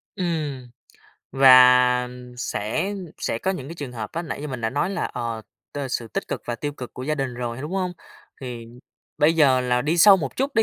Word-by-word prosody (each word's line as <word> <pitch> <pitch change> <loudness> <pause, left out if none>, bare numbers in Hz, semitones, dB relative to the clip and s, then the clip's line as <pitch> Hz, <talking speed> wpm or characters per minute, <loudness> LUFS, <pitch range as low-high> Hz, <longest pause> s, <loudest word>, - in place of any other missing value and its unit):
Ừm, 155 - -3 0.6
và 125 -1 +6 0.3
sẽ 125 - -2 0.2
sẽ 115 - -2
có 190 - -1
những 140 -8 -6
cái 165 - -8
trường 145 -6 -6
hợp 110 -3 -6
á, 170 - -3
nãy 155 -4 -6
như 150 - -5
mình 130 -3 -6
đã 110 - 0
nói 145 +8 -1
là, 195 - -2
ờ, 115 -2 -4 0.3
t - - -6
sự 120 -2 -3
tích 110 - -4
cực - - -4
và 120 - -3
tiêu 145 +4 -4
cực 125 -5 -9
của 125 - -7
gia 155 +3 -1
đình 135 -3 -3
rồi, 120 -1 -4
đúng 150 - -6
hông? 185 -2 -1 0.5
Thì 120 -3 -7 0.5
bây 150 +2 +5
giờ 135 -5 +4
là 125 0 0
đi 160 +5 0
sâu 200 +2 +8
một 140 -7 -5
chút 275 +2 -1
đi, 225 - +4
130 Hz, 220 wpm, -23 LUFS, 125-160 Hz, 0.6 s, sâu